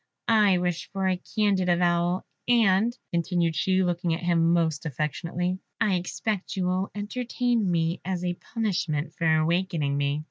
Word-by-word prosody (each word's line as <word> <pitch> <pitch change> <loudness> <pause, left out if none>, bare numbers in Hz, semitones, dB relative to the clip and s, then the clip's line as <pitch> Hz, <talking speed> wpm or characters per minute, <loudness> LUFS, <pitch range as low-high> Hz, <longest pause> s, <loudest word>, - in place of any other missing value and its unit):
I 210 -4 +5
wish 175 -2 -2
for 195 -1 -1
a 185 -1 0
candid 200 -4 +2
avowal, 175 +1 +2 0.2
and," 230 0 +3 0.2
continued 170 -1 +1
she, 190 +2 +2
looking 175 -2 0
at 170 - -8
him 170 -1 +3
most 160 -3 +1
affectionately, 170 +5 -2 0.2
"I 215 -4 +2
expect 185 +3 -2
you 185 -2 -1
will 185 +2 0
entertain 235 0 -1
me 165 0 0
as 180 -1 -3
a 175 - 0
punishment 175 -7 -2
for 165 -1 +1
awaking 160 -2 0
me." 140 +1 0
180 Hz, 150 wpm, -26 LUFS, 170-195 Hz, 0.2 s, I